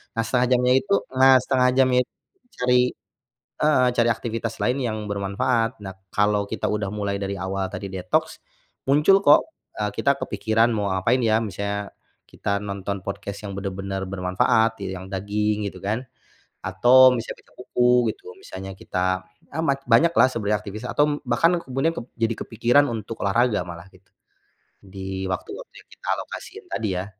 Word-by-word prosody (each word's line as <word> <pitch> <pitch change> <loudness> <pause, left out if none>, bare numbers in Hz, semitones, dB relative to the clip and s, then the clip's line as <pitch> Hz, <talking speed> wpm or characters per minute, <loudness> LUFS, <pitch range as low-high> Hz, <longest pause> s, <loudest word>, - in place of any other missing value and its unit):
nah, 115 - +1
1/2 125 +1 +2
jamnya 125 0 +3
itu 200 +7 -2 0.2
nah, 130 0 +7
1/2 125 -1 +3
jamnya 130 -1 +4
itu - - -62 0.5
cari 125 0 +4 0.8
heeh, 145 -4 +4
cari 120 0 +4
aktivitas 115 0 -3
lain 125 +2 +1
yang 110 -3 -2
bermanfaat. 115 +4 0
Nah, 95 - -6 0.2
kalau 105 0 +2
kita - - -3
udah 105 -2 -1
mulai 100 -1 -2
dari 100 0 -3
awal 95 +1 -3
tadi 100 +1 -6
detoks, 155 - -1 0.5
muncul 150 +8 +5
kok, 145 - +7 0.4
eee, 105 -1 -1
kita 140 0 +2
kepikiran, 110 +3 +1
"Mau 105 -2 -1
ngapain 110 +7 +1
ya?" 110 -1 +3
Misalnya 100 0 -4 0.4
kita 100 0 -2
nonton 100 -1 -4
podcast 100 0 -5
yang 100 - -5
benar-benar 95 0 -4
bermanfaat, 100 +4 +1
iya, 95 -1 -4
yang, 95 - -9
“daging” 105 +2 -1
gitu - - -12
kan, 105 +7 -2 0.6
atau 125 +7 +6
bisa 115 - -5
baca - - -23
buku 125 -1 +2
gitu. 435 +3 -13
Misalnya 95 - -8
kita 95 0 -1 0.4
amat, 140 -3 +1
banyaklah 130 +1 +5
sebenernya 105 -4 -1
aktivis 105 +2 -8
atau 145 +3 +2
m 150 - 0
bahkan 165 +7 +3
ke 170 - -8
kemudian 145 +6 +1
kep - - -4 0.2
jadi 115 0 +1
kepikiran 120 +5 +3
untuk 115 0 -5
olahraga 115 0 +2
malah 85 +1 -9
gitu, 95 +1 -24 0.7
di 95 -1 -6
waktu-waktu 95 -1 -6
yang - - -52
kita - - -16
alokasiin - - -8
tadi 105 +2 -2
ya. - - -6
105 Hz, 165 wpm, -23 LUFS, 100-125 Hz, 0.8 s, nah